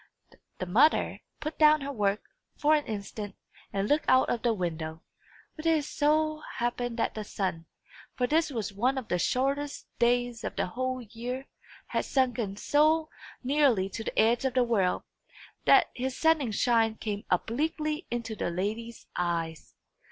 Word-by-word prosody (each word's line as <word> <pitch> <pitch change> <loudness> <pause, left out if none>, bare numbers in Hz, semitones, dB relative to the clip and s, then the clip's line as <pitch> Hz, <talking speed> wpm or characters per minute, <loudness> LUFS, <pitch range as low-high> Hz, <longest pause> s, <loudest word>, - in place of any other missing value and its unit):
The 185 - -3
mother 235 - +3 0.2
put 310 +1 -5
down 305 -1 +6
her 280 +1 -3
work, 205 -4 0 0.3
for 300 +1 +4
an 300 -1 +2
instant, 205 -1 -5 0.4
and 195 +1 -1
looked 295 +5 +2
out 260 0 +5
of 235 - -1
the 240 - +2
window. 165 -4 -3 0.5
But 310 0 -4
it 315 -3 +3
so 310 +1 +1
happened 240 0 -2
that - - 0
the 215 - -4
sun 185 -5 -3 0.5
for 250 - +1
this 315 +5 +2
was 220 -7 -3
one 250 +7 +1
of 250 -4 -5
the 180 - +1
shortest 275 +7 0
days 240 -1 +2
of - - -4
the - - 0
whole 255 +5 -3
year 240 +4 -5 0.4
had - - -2
sunken 240 -7 0
so 310 +4 +3 0.3
nearly 255 -8 +3
to 225 - -5
the - - -5
edge 230 +3 +4
of 265 -1 -1
the 255 - +5
world, 205 -7 +1 0.6
that - - +6
his 255 +1 -3
setting 320 -6 +3
shine 225 0 +2
came 210 -2 -4
obliquely 305 - -1
into 230 -2 -3
the 205 - -2
lady's 215 +6 -4
eyes. 165 -2 -2
240 Hz, 160 wpm, -29 LUFS, 205-285 Hz, 0.6 s, down